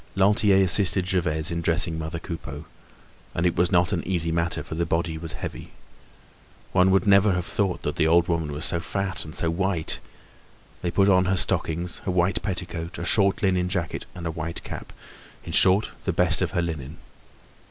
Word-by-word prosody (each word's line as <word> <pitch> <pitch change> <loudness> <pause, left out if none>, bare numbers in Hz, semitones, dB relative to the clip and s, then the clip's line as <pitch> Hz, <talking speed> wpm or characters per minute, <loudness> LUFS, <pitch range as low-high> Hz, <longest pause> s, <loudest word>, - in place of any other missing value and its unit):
Lantier 100 0 +4
assisted 95 0 +4
Gervaise 80 -4 0
in 85 0 -2
dressing 85 0 +1
mother 80 +1 -4
Coupeau—and 80 +1 -8
it 85 -1 +2
was 90 0 +2
not 90 +2 +3
an 85 - 0
easy 85 -3 0
matter, 85 -1 -1
for 80 - -8
the 85 +2 -1
body 80 0 -1
was 80 0 -7
heavy. - - -7 1.0
One 95 0 +4
would 95 -1 +3
never 100 0 +5
have 90 -1 -2
thought 95 -2 -1
that - - -3
that - - +3
old 85 +1 +4
woman 80 -3 -1
was 75 +4 -3
so 85 - +1
fat 95 +1 -3
and 75 0 -8
so 85 - 0
white. 90 -1 -1 0.8
They 90 - -1
put 95 +3 +3
on 95 -2 +4
her 95 0 +1
stockings, 85 +1 -1
a - - -3
white 90 +1 +1
petticoat, 90 -3 -4
a 85 - -4
short 100 +1 +2
linen 90 -2 +2
jacket 90 -3 -3
and 90 -1 -7
a 85 - -1
white 85 +1 -5
cap—in - - -11
short, 95 +3 +4
the 95 - 0
best 90 +1 +2
of - - +1
her 85 -3 +1
linen. 80 -3 -5
85 Hz, 185 wpm, -25 LUFS, 80-95 Hz, 1.0 s, never